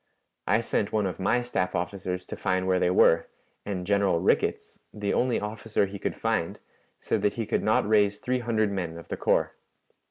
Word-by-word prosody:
I 115 Hz, -, +3 dB
sent 105 Hz, -2 st, -1 dB
one 105 Hz, -2 st, +1 dB
of 95 Hz, -, -4 dB
my 120 Hz, +6 st, +1 dB
staff 90 Hz, -7 st, -2 dB
officers 90 Hz, +1 st, -3 dB
to -, -, -6 dB
find 95 Hz, 0 st, -1 dB
where 95 Hz, -1 st, +2 dB
they 90 Hz, -, +2 dB
were, 85 Hz, -2 st, +4 dB, 0.4 s
and 95 Hz, -3 st, -3 dB
General 100 Hz, -3 st, +2 dB
Rickets, -, -, 0 dB
the 105 Hz, -1 st, -2 dB
only 125 Hz, -1 st, +1 dB
officer 105 Hz, 0 st, -1 dB
he 100 Hz, +1 st, -8 dB
could -, -, -2 dB
find, -, -, -1 dB, 0.4 s
said -, -, -1 dB
that 105 Hz, -, +1 dB
he 115 Hz, -, -2 dB
could -, -, 0 dB
not 110 Hz, -1 st, +2 dB
raise 105 Hz, -1 st, +3 dB
three 125 Hz, +4 st, -1 dB
hundred 110 Hz, -3 st, 0 dB
men 90 Hz, -4 st, -3 dB
of 85 Hz, -, -12 dB
the -, -, -3 dB
corps. -, -, +1 dB
100 Hz, 195 wpm, -27 LUFS, 90-110 Hz, 0.4 s, were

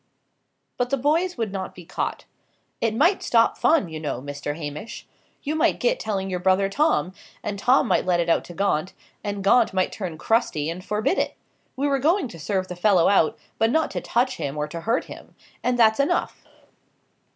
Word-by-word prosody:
But 245 Hz, 0 st, 0 dB
the 275 Hz, -, +1 dB
boys 320 Hz, +7 st, +1 dB
would 225 Hz, -4 st, -2 dB
not 190 Hz, -1 st, -5 dB
be 180 Hz, -, -11 dB
caught. -, -, -4 dB, 0.6 s
"It 225 Hz, -1 st, +1 dB
might 340 Hz, -, +3 dB
stop 230 Hz, -1 st, +3 dB
fun, 315 Hz, -, +3 dB
you 160 Hz, -1 st, -6 dB
know, 145 Hz, -5 st, -3 dB
Mr. 145 Hz, +2 st, -5 dB
Hamish. 150 Hz, +6 st, -7 dB, 0.4 s
You 295 Hz, -, -2 dB
might 315 Hz, -, +2 dB
get -, -, +1 dB
telling 195 Hz, -3 st, -2 dB
your 185 Hz, -2 st, -2 dB
brother 190 Hz, +2 st, +2 dB
Tom; 285 Hz, -, +1 dB, 0.3 s
and 205 Hz, -1 st, -4 dB
Tom 255 Hz, +4 st, +3 dB
might 190 Hz, -, +2 dB
let 180 Hz, -1 st, +1 dB
it 170 Hz, -, 0 dB
out 170 Hz, -, +2 dB
to 175 Hz, -, -11 dB
Gaunt; 190 Hz, -3 st, 0 dB, 0.3 s
and 205 Hz, -1 st, -3 dB
Gaunt 220 Hz, +1 st, +4 dB
might 185 Hz, -1 st, +1 dB
turn 180 Hz, -6 st, -5 dB
crusty 160 Hz, -8 st, 0 dB
and 180 Hz, +2 st, -7 dB
forbid 210 Hz, -, 0 dB
it. -, -, -1 dB, 0.4 s
We 280 Hz, +2 st, 0 dB
were 275 Hz, -1 st, +1 dB
going 330 Hz, +4 st, +2 dB
to 170 Hz, -, -11 dB
serve 185 Hz, +3 st, -1 dB
the 180 Hz, -, -6 dB
fellow 180 Hz, -1 st, +4 dB
out; 190 Hz, -6 st, +3 dB, 0.2 s
but 225 Hz, -, +3 dB
not 320 Hz, +6 st, +1 dB
to -, -, -3 dB
touch 245 Hz, +2 st, 0 dB
him 140 Hz, +1 st, -4 dB
or 150 Hz, 0 st, -1 dB
to 170 Hz, +1 st, -6 dB
hurt 230 Hz, -, 0 dB
him; -, -, -12 dB, 0.3 s
and 250 Hz, 0 st, +1 dB
that's 220 Hz, 0 st, +4 dB
enough." 280 Hz, -, 0 dB
200 Hz, 200 wpm, -24 LUFS, 175-250 Hz, 0.6 s, Gaunt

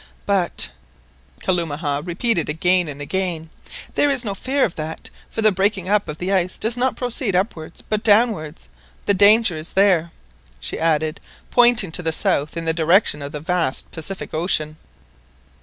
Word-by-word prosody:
"But," 195 Hz, -4 st, +1 dB, 0.7 s
Kalumah 155 Hz, -5 st, -1 dB
repeated 175 Hz, +1 st, 0 dB
again 175 Hz, +3 st, +2 dB
and 145 Hz, -1 st, -7 dB
again, 170 Hz, -1 st, -2 dB, 0.4 s
"there 290 Hz, -, +3 dB
is 265 Hz, -3 st, 0 dB
no 200 Hz, -, -2 dB
fear 265 Hz, +7 st, 0 dB
of 175 Hz, -, -5 dB
that, 155 Hz, +1 st, -6 dB, 0.2 s
the 220 Hz, -1 st, +5 dB
breaking 190 Hz, -1 st, 0 dB
up 210 Hz, 0 st, +2 dB
of 150 Hz, -, -5 dB
the 185 Hz, +4 st, -2 dB
ice 185 Hz, -1 st, 0 dB
does 225 Hz, +2 st, -1 dB
not 255 Hz, +1 st, 0 dB
proceed 245 Hz, -5 st, -2 dB
upwards 175 Hz, -4 st, -3 dB
but 215 Hz, -1 st, 0 dB
downwards. 205 Hz, -, +2 dB, 0.4 s
The 200 Hz, -, +3 dB
danger 205 Hz, -1 st, +5 dB
is 155 Hz, +2 st, -5 dB
there!" 185 Hz, -4 st, +3 dB, 0.5 s
she 65 Hz, -, -5 dB
added, 155 Hz, -1 st, 0 dB, 0.3 s
pointing 240 Hz, -6 st, +4 dB
to 180 Hz, -, -2 dB
the 165 Hz, -2 st, 0 dB
south 150 Hz, 0 st, -1 dB
in 165 Hz, -, -3 dB
the 160 Hz, -, +1 dB
direction 165 Hz, -1 st, +2 dB
of 140 Hz, 0 st, -6 dB
the 150 Hz, -2 st, -6 dB
vast 165 Hz, -4 st, -1 dB
Pacific 180 Hz, +4 st, -6 dB
Ocean. 155 Hz, -2 st, -1 dB
180 Hz, 160 wpm, -20 LUFS, 160-205 Hz, 0.7 s, the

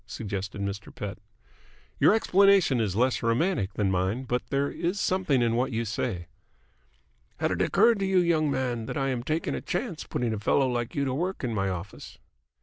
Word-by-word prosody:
suggested 100 Hz, -4 st, -5 dB
Mr. 100 Hz, +1 st, -4 dB
Pett. 100 Hz, -2 st, -6 dB, 0.8 s
"Your -, -, +6 dB
explanation 195 Hz, -, +4 dB
is 100 Hz, -4 st, -1 dB
less 125 Hz, +3 st, +2 dB
romantic 115 Hz, -, 0 dB
than 100 Hz, -3 st, +1 dB
mine, 95 Hz, +7 st, 0 dB
but 125 Hz, -1 st, -1 dB
there 140 Hz, +1 st, +1 dB
is 180 Hz, +4 st, -2 dB
something 180 Hz, -11 st, +1 dB
in 115 Hz, -1 st, +1 dB
what 125 Hz, +3 st, 0 dB
you 115 Hz, 0 st, -1 dB
say." 105 Hz, -4 st, -3 dB, 1.1 s
"Had -, -, 0 dB
it -, -, -1 dB
occurred 225 Hz, +2 st, +4 dB
to 195 Hz, -, 0 dB
you, 190 Hz, -1 st, +2 dB
young 165 Hz, -4 st, +3 dB
man, 125 Hz, -4 st, -2 dB
that -, -, -4 dB
I 135 Hz, -1 st, 0 dB
am 125 Hz, -2 st, -1 dB
taking 155 Hz, +6 st, -2 dB
a -, -, -3 dB
chance 175 Hz, -2 st, -3 dB
putting 120 Hz, -2 st, -2 dB
a 110 Hz, -, -3 dB
fellow 135 Hz, +6 st, +2 dB
like 120 Hz, -2 st, -2 dB
you 140 Hz, -1 st, 0 dB
to 130 Hz, -, -1 dB
work 180 Hz, +6 st, -2 dB
in 120 Hz, -3 st, -1 dB
my 95 Hz, -2 st, 0 dB
office?" 95 Hz, +2 st, -7 dB
125 Hz, 195 wpm, -27 LUFS, 105-165 Hz, 1.1 s, Your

